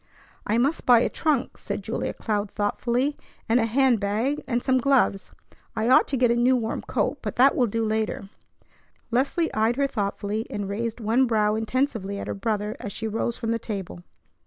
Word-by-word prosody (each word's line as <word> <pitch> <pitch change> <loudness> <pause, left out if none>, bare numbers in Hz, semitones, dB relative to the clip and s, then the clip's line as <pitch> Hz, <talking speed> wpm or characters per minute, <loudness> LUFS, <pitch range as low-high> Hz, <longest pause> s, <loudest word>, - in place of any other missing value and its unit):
"I 215 - +2
must 275 +7 0
buy 240 -2 +7
a - - +1
trunk," 295 -5 -1
said - - -5
Julia - - -3
Cloud 210 -2 -2
thoughtfully, 240 +7 -1 0.3
"and 230 +2 +3
a 225 - +1
hand 255 0 +3
bag 220 +9 -1
and 240 -2 -1
some 260 -1 +2
gloves. 250 -7 +2 0.5
I 220 +2 0
ought 255 - +6
to 275 - -1
get 245 -1 +3
a - - +2
new 245 +2 +3
warm 225 -2 -2
coat, - - -1
but - - -4
that 265 +3 +5
will 245 - +2
do 225 +1 -1
later." 215 -2 -2 0.8
Leslie 280 +7 +1
eyed 220 +2 +2
her 280 +1 +1
thoughtfully, 205 -2 -2
and 205 -1 -4
raised 225 +4 -3
one 235 +4 +2
brow 210 -2 +2
intensively 220 -3 -1
at - - -5
her - - -3
brother 210 0 -2
as 205 - -6
she 225 +2 -4
rose 225 +2 -2
from 230 -2 -2
the 230 - 0
table. 195 -6 -6
230 Hz, 195 wpm, -25 LUFS, 210-255 Hz, 0.8 s, buy